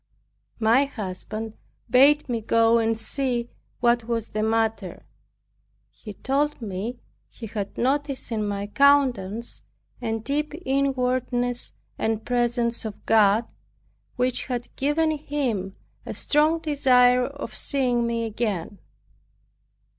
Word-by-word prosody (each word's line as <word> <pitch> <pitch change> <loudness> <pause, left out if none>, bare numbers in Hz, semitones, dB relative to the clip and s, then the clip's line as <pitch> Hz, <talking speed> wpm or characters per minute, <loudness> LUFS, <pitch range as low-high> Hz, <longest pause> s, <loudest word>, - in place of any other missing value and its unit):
My 230 +5 +4
husband 215 -2 -6 0.3
bade 285 +4 +5
me 235 -3 -2
go 230 +1 +3
and 225 0 +1
see 240 -1 -2 0.3
what 235 -1 +3
was 230 -1 -2
the 215 - -2
matter. 225 0 -1 0.9
He 210 - -10
told 285 +5 0
me 220 +2 -4 0.3
he 230 - -9
had 205 -2 -5
noticed 275 0 -1
in 220 -2 -1
my 200 0 -2
countenance 240 -4 +2 0.4
a 225 -2 -1
deep 290 +6 -2
inwardness 255 -2 0 0.3
and 220 0 -1
presence 240 -1 0
of 215 -2 -7
God, 215 0 +4 0.7
which 250 0 0
had 245 -2 -5
given 305 +3 +1
him 265 -11 -2 0.3
a - - -6
strong 305 +2 +2
desire 250 -5 +4
of 280 +2 -7
seeing 245 -4 +1
me 230 0 -1
again. 205 -4 -3
240 Hz, 115 wpm, -24 LUFS, 225-270 Hz, 0.9 s, bade